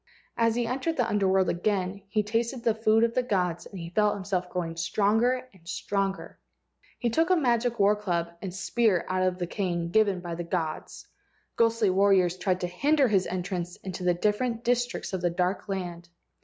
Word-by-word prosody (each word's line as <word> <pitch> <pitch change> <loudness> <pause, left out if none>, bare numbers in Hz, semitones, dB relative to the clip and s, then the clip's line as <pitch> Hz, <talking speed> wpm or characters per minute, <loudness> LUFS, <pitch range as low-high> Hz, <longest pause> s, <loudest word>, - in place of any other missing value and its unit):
As 230 -1 +2
he 240 0 0
entered 270 +7 -2
the 245 -3 +2
Under 205 -3 +1
world 190 -1 +3
he - - +1
again 190 +1 -1 0.2
tasted 230 +3 -1
the 230 -2 +3
food 220 0 +3
of 230 0 +2
the 255 - +2
gods 180 -8 -1
and 195 - -10
he 170 0 -7
felt 210 +2 +2
himself 185 -2 -2
growing 170 -2 -3
stronger 220 +9 +1
and 170 -3 -21
stronger. 195 +1 -3 0.6
He 240 -2 -1
took 325 +7 +2
a 370 - +5
magic 240 -5 +1
war 205 +1 +5
club 175 -5 -2
and 190 - -4
a - - -11
spear 205 -2 +1
out 185 0 0
of 185 -1 +1
the 180 - -2
cane 175 -3 -2
given 205 -3 +3
by 175 -1 -6
the 175 +1 -4
gods. 165 -2 -4 0.5
Ghostly 230 -3 +3
warriors 190 -2 +3
tried 185 0 -1
to 180 - -1
hinder 275 - +2
his 195 -3 +2
entrance 180 -1 -3
into 185 -1 -7
the 180 -1 +2
different 225 +5 0
districts 245 -3 -1
of 185 - -2
the 175 - +2
dark 180 +4 -1
land. 175 -3 -4
195 Hz, 195 wpm, -27 LUFS, 180-230 Hz, 0.6 s, a